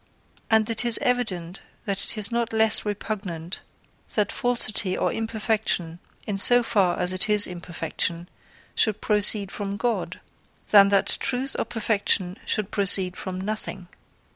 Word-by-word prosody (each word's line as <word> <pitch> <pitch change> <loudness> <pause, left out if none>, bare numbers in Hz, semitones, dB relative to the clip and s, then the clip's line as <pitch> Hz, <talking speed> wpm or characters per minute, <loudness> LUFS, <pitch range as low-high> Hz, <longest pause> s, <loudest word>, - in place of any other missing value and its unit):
And 220 -1 +3
it 230 0 -1
is 235 -1 +5
evident 195 -8 -2 0.2
that 195 -2 -1
it - - -4
is 210 +1 -2
not 235 -1 -2
less 220 -1 +2
repugnant 195 -5 -5 0.5
that 210 -2 0
falsity 215 -6 +2
or - - -1
imperfection, 215 -6 -2 0.3
in 200 -2 -3
so 245 +4 +5
far 195 -7 +1
as 180 +1 +2
it 185 +3 -1
is 210 -1 +8
imperfection, 170 -1 -4 0.5
should 215 -2 0
proceed 210 -2 +3
from 200 -1 -5
God, 240 +1 -3 0.5
than 200 -1 +7
that 200 -1 +2
truth 270 0 -1
or - - -1
perfection 205 -5 -1
should 215 -2 -2
proceed 190 -2 +1
from 185 -1 -6
nothing. 195 -3 -5
205 Hz, 140 wpm, -24 LUFS, 185-220 Hz, 0.5 s, is